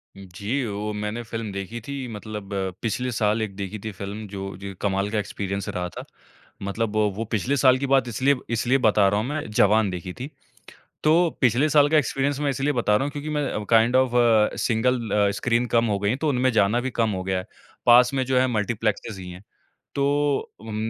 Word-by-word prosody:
जी, 100 Hz, +8 st, -4 dB
वो 105 Hz, 0 st, -3 dB
मैंने 105 Hz, +3 st, -3 dB
फ़िल्म 115 Hz, -2 st, -5 dB
देखी 100 Hz, +4 st, -5 dB
थी 140 Hz, -2 st, -4 dB
मतलब 105 Hz, -1 st, -7 dB, 0.3 s
पिछले 125 Hz, +2 st, -2 dB
साल 110 Hz, -1 st, +1 dB
एक 100 Hz, -3 st, -4 dB
देखी 100 Hz, +1 st, -5 dB
थी 110 Hz, +2 st, -5 dB
फ़िल्म 100 Hz, +2 st, -7 dB
जो 95 Hz, 0 st, -6 dB
जो 100 Hz, 0 st, -7 dB
कमाल 100 Hz, 0 st, 0 dB
का 110 Hz, -, 0 dB
एक्सपीरियंस 100 Hz, -1 st, -4 dB
रहा 90 Hz, -1 st, -3 dB
था। -, -, -8 dB, 0.6 s
मतलब 110 Hz, +2 st, -2 dB
वो 105 Hz, +1 st, 0 dB
पिछले 125 Hz, +6 st, 0 dB
साल 130 Hz, -1 st, +5 dB
की 140 Hz, -, -2 dB
बात 135 Hz, -2 st, +3 dB
इसलिए 130 Hz, +5 st, +2 dB, 0.2 s
इसलिए 125 Hz, +3 st, +2 dB
बता 105 Hz, -2 st, +5 dB
रहा 105 Hz, -, +1 dB
हूँ 110 Hz, -, -2 dB
मैं 150 Hz, +1 st, -3 dB
जवान 105 Hz, 0 st, +3 dB
देखी 90 Hz, 0 st, -6 dB
थी। 130 Hz, +8 st, -7 dB, 0.7 s
तो 165 Hz, +2 st, +4 dB
पिछले 130 Hz, +4 st, +3 dB
साल 145 Hz, -1 st, +5 dB
का 155 Hz, -, +4 dB
एक्सपीरियंस 140 Hz, 0 st, 0 dB
मैं 145 Hz, -1 st, 0 dB
इसलिए 140 Hz, +2 st, 0 dB
बता 110 Hz, -4 st, +2 dB
रहा 135 Hz, -, +2 dB
हूँ 145 Hz, -, -2 dB
क्योंकि 150 Hz, +1 st, -6 dB
मैं 145 Hz, -8 st, -2 dB
kind 115 Hz, +2 st, +4 dB
of 130 Hz, -2 st, +3 dB
a, 115 Hz, -3 st, +4 dB
single 115 Hz, 0 st, 0 dB
a, 100 Hz, -1 st, +3 dB
screen 120 Hz, +4 st, 0 dB
कम 115 Hz, 0 st, +4 dB
हो 105 Hz, -3 st, 0 dB
गयी 100 Hz, +1 st, +1 dB
है 130 Hz, -, -1 dB
तो 155 Hz, 0 st, 0 dB
उनमें 130 Hz, -1 st, +2 dB
जाना 105 Hz, +2 st, +3 dB
भी 130 Hz, -, -2 dB
कम 115 Hz, -2 st, +1 dB
हो 95 Hz, -1 st, -3 dB
गया 95 Hz, 0 st, -1 dB
है। 90 Hz, -, -7 dB, 0.4 s
पास 125 Hz, +1 st, +6 dB
में 130 Hz, -1 st, +1 dB
जो 130 Hz, 0 st, +1 dB
है 130 Hz, -, +3 dB
मल्टीप्लेक्स 110 Hz, -2 st, -2 dB
ही 90 Hz, -1 st, -8 dB
है। 90 Hz, -, -11 dB, 0.5 s
तो 140 Hz, 0 st, +1 dB, 0.5 s
उम, 110 Hz, -1 st, -7 dB
115 Hz, 210 wpm, -24 LUFS, 100-130 Hz, 0.7 s, पास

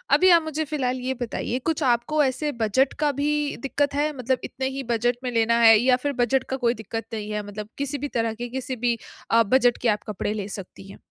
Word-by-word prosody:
अभी 370 Hz, -, +5 dB
आप 340 Hz, -1 st, +7 dB
मुझे 315 Hz, 0 st, -2 dB
फिलहाल 260 Hz, -4 st, -2 dB
ये 255 Hz, +1 st, -2 dB
बताइए, 245 Hz, +1 st, -2 dB
कुछ 320 Hz, +4 st, -2 dB
आपको 260 Hz, +5 st, +2 dB
ऐसे 275 Hz, +3 st, -1 dB
बजट 260 Hz, +6 st, +2 dB
का 295 Hz, -1 st, +2 dB
भी 295 Hz, +1 st, -1 dB
दिक्कत 285 Hz, +1 st, 0 dB
है? 295 Hz, +1 st, +1 dB
मतलब 255 Hz, +1 st, 0 dB
इतने 265 Hz, +1 st, -3 dB
ही 275 Hz, -, -3 dB
बजट 240 Hz, +1 st, +1 dB
में 250 Hz, -, -2 dB
लेना 230 Hz, 0 st, +2 dB
है 225 Hz, -1 st, +8 dB
या 250 Hz, +2 st, +4 dB
फिर 285 Hz, 0 st, 0 dB
बजट 260 Hz, +2 st, +1 dB
का -, -, 0 dB
कोई 240 Hz, -3 st, +1 dB
दिक्कत 225 Hz, 0 st, -6 dB
नहीं 210 Hz, -1 st, -4 dB
है? 210 Hz, 0 st, -2 dB
मतलब 210 Hz, +1 st, -7 dB
किसी 280 Hz, +1 st, -2 dB
भी 290 Hz, +1 st, -3 dB
तरह 225 Hz, -1 st, 0 dB
के 240 Hz, +2 st, -6 dB
किसी 260 Hz, +1 st, -4 dB
भी 240 Hz, 0 st, 0 dB, 0.3 s
अ, 230 Hz, 0 st, +6 dB
बजट 245 Hz, +2 st, +3 dB
के 245 Hz, -, +2 dB
आप 210 Hz, -1 st, 0 dB
कपड़े 210 Hz, 0 st, -2 dB
ले 205 Hz, -2 st, -4 dB
सकती 195 Hz, -1 st, -8 dB
हैं? -, -, -12 dB
250 Hz, 240 wpm, -24 LUFS, 225-280 Hz, 0.3 s, है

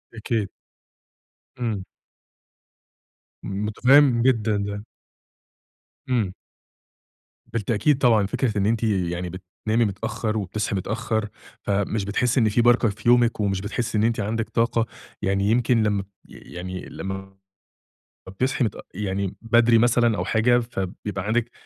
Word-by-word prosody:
أكيد. 110 Hz, -2 st, -2 dB, 1.1 s
إمم. 110 Hz, -6 st, -2 dB, 1.6 s
متفهم 120 Hz, +6 st, +3 dB
جدًا 115 Hz, -5 st, +2 dB
ده. 100 Hz, +1 st, -4 dB, 1.3 s
إمم. 110 Hz, -7 st, +1 dB, 1.1 s
بالتأكيد 115 Hz, +5 st, +1 dB
طبعًا. 115 Hz, -6 st, +4 dB
فكرة 110 Hz, +2 st, -1 dB
إن 100 Hz, -, +1 dB
أنتِ 115 Hz, +1 st, +1 dB
يعني 90 Hz, -4 st, -1 dB
بتنامي 95 Hz, +6 st, -2 dB
متأخر 110 Hz, +2 st, -2 dB
وبتصحي 105 Hz, +1 st, -2 dB
متأخر، 110 Hz, +2 st, -2 dB, 0.3 s
فمش 100 Hz, +1 st, -1 dB
بتحسي 125 Hz, +5 st, +1 dB
إن 110 Hz, -3 st, +3 dB
في 115 Hz, +3 st, +2 dB
بركة 120 Hz, -1 st, +4 dB
في 105 Hz, +2 st, -7 dB
يومِك 120 Hz, -2 st, +4 dB
ومش 100 Hz, -2 st, 0 dB
بتحسي 110 Hz, +2 st, -2 dB
إن 105 Hz, -, +2 dB
أنتِ 115 Hz, 0 st, +1 dB
عندِك 110 Hz, +2 st, -2 dB
طاقة، 115 Hz, 0 st, +1 dB, 0.4 s
يعني 100 Hz, 0 st, +1 dB
يمكن 115 Hz, -1 st, +3 dB
لما 105 Hz, -2 st, 0 dB, 0.2 s
يعني 90 Hz, +1 st, -8 dB
لما 95 Hz, 0 st, -7 dB, 0.9 s
ب -, -, -7 dB
بتصحي 130 Hz, +5 st, 0 dB
متأ 110 Hz, -, -2 dB
يعني 100 Hz, 0 st, -3 dB
بدري 115 Hz, 0 st, +4 dB
مثلًا 120 Hz, -1 st, +3 dB
أو -, -, -2 dB
حاجة، 120 Hz, +2 st, +3 dB
فبيبقى 95 Hz, -3 st, -5 dB
عندِك 120 Hz, +1 st, 0 dB
110 Hz, 120 wpm, -24 LUFS, 100-120 Hz, 1.6 s, طبعًا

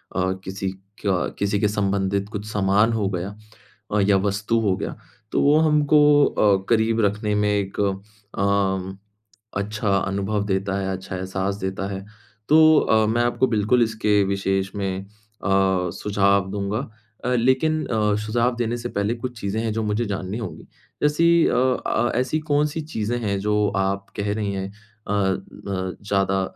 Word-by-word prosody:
अ, 95 Hz, 0 st, +1 dB
किसी 95 Hz, 0 st, -4 dB, 0.4 s
का 95 Hz, -3 st, +1 dB
किसी 100 Hz, 0 st, +1 dB
के 105 Hz, -, +2 dB
संबंधित 100 Hz, -1 st, 0 dB
कुछ 105 Hz, 0 st, -5 dB
सामान 105 Hz, +3 st, +2 dB
हो 105 Hz, -3 st, 0 dB
गया, 90 Hz, 0 st, -3 dB, 0.6 s
अ, 105 Hz, -, +2 dB
या 100 Hz, 0 st, +4 dB
वस्तु 100 Hz, +3 st, 0 dB
हो 100 Hz, -4 st, +1 dB
गया। -, -, -4 dB, 0.4 s
तो -, -, +1 dB
वो 145 Hz, +2 st, +5 dB
हमको 150 Hz, -1 st, +5 dB
अ, 100 Hz, -2 st, +2 dB
करीब 115 Hz, 0 st, +2 dB
रखने 105 Hz, +1 st, 0 dB
में 105 Hz, 0 st, +2 dB
एक 100 Hz, -1 st, -2 dB
अ, 100 Hz, -1 st, +2 dB, 0.5 s
म 95 Hz, -1 st, 0 dB, 0.6 s
अच्छा 105 Hz, +1 st, -2 dB
अनुभव 100 Hz, +2 st, -1 dB
देता 95 Hz, 0 st, -1 dB
है, 95 Hz, -, -2 dB
अच्छा 95 Hz, 0 st, -6 dB
एहसास 95 Hz, +1 st, -2 dB
देता 95 Hz, 0 st, -3 dB
है। 95 Hz, +1 st, -6 dB, 0.4 s
तो 155 Hz, +1 st, +7 dB
अ, 110 Hz, 0 st, +3 dB
मैं 120 Hz, +2 st, +1 dB
आपको 120 Hz, +2 st, +1 dB
बिल्कुल 110 Hz, +2 st, +2 dB
इसके 110 Hz, -2 st, +2 dB
विशेष 95 Hz, 0 st, -1 dB
में 95 Hz, -1 st, -2 dB
अ, 100 Hz, -, -17 dB, 0.9 s
सुझाव 100 Hz, -1 st, +1 dB
दूँगा। 100 Hz, +1 st, -2 dB, 0.5 s
अ, 125 Hz, -, +1 dB
लेकिन 150 Hz, +6 st, +2 dB
अ, 105 Hz, -4 st, +1 dB
सुझाव 120 Hz, +3 st, +1 dB
देने 120 Hz, 0 st, -1 dB
से 120 Hz, 0 st, -5 dB
पहले 100 Hz, +1 st, -1 dB
कुछ 120 Hz, -1 st, -6 dB
चीज़ें 100 Hz, +2 st, -2 dB
हैं, 110 Hz, -, -1 dB
जो 110 Hz, -, -1 dB
मुझे 105 Hz, +2 st, 0 dB
जाननी 100 Hz, 0 st, -4 dB
होंगी। 115 Hz, -, -7 dB, 0.4 s
जैसी 165 Hz, +3 st, +4 dB
अ -, -, +1 dB, 0.3 s
अ, 120 Hz, +2 st, +1 dB
ऐसी 130 Hz, +5 st, 0 dB
कौन-सी 150 Hz, +2 st, +1 dB
चीज़ें 120 Hz, -6 st, -3 dB
हैं? 100 Hz, -4 st, -1 dB
जो 105 Hz, +1 st, +1 dB
आप 95 Hz, +1 st, -1 dB
कह 100 Hz, 0 st, -1 dB
रही 105 Hz, -2 st, -2 dB
हैं, 95 Hz, 0 st, -3 dB, 0.4 s
अ -, -, -1 dB
अ, 95 Hz, -2 st, +1 dB, 0.6 s
ज़्यादा 95 Hz, -1 st, +1 dB
105 Hz, 165 wpm, -23 LUFS, 100-115 Hz, 0.9 s, तो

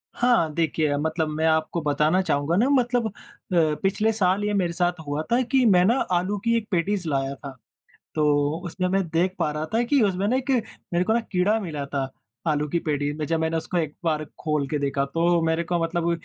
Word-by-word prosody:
हाँ 235 Hz, -11 st, +2 dB
देखिए, 155 Hz, -2 st, 0 dB
मतलब 160 Hz, +2 st, -1 dB
मैं 155 Hz, +1 st, -1 dB
आपको 160 Hz, +1 st, +1 dB
बताना 150 Hz, +4 st, +2 dB
चाहूँगा 145 Hz, -2 st, 0 dB
ना 240 Hz, +6 st, +3 dB
मतलब 245 Hz, -4 st, +2 dB
अ, -, -, -6 dB, 0.7 s
पिछले 210 Hz, +3 st, +2 dB
साल 195 Hz, -1 st, +1 dB
ये 210 Hz, 0 st, 0 dB
मेरे 180 Hz, -4 st, 0 dB
साथ 175 Hz, 0 st, 0 dB
हुआ 145 Hz, +1 st, -1 dB
था 240 Hz, +2 st, +4 dB
कि 265 Hz, -2 st, +4 dB
मैं 185 Hz, -5 st, +5 dB
ना 230 Hz, +5 st, +4 dB, 0.2 s
आलू 185 Hz, +3 st, +1 dB
की 230 Hz, 0 st, +3 dB
एक 220 Hz, -2 st, -4 dB
पैटीज़ 185 Hz, 0 st, 0 dB
लाया 135 Hz, -1 st, -1 dB
था, 140 Hz, 0 st, -9 dB, 0.6 s
तो 150 Hz, 0 st, +2 dB
उसमें 185 Hz, +2 st, -2 dB
मैं 195 Hz, +1 st, +1 dB
देख 175 Hz, +3 st, 0 dB
पा 150 Hz, -, +1 dB
रहा 150 Hz, +1 st, -3 dB
था 230 Hz, -, +3 dB
कि 275 Hz, +3 st, +2 dB
उसमें 195 Hz, -1 st, +1 dB
ना 250 Hz, -, +2 dB
एक 265 Hz, +1 st, -2 dB, 0.4 s
मेरे 175 Hz, +1 st, +2 dB
को 220 Hz, -, +1 dB
ना 235 Hz, -, +2 dB
कीड़ा 195 Hz, +4 st, +2 dB
मिला 155 Hz, -8 st, -4 dB
था, 140 Hz, -1 st, -2 dB, 0.4 s
आलू 150 Hz, -1 st, +1 dB
की 170 Hz, -, 0 dB
पैटी 145 Hz, -3 st, -1 dB
में 155 Hz, -, -3 dB
जब 165 Hz, +1 st, 0 dB
मैंने 160 Hz, 0 st, 0 dB
उसको 175 Hz, +2 st, -2 dB
एक 155 Hz, -3 st, -2 dB
बार 155 Hz, -2 st, 0 dB, 0.2 s
खोल 150 Hz, -3 st, 0 dB
के 150 Hz, -, -1 dB
देखा, 140 Hz, -1 st, 0 dB
तो 170 Hz, +4 st, +1 dB
मेरे 160 Hz, +1 st, 0 dB
को 175 Hz, +1 st, -1 dB
मतलब 170 Hz, 0 st, -1 dB
170 Hz, 220 wpm, -24 LUFS, 150-195 Hz, 0.7 s, मैं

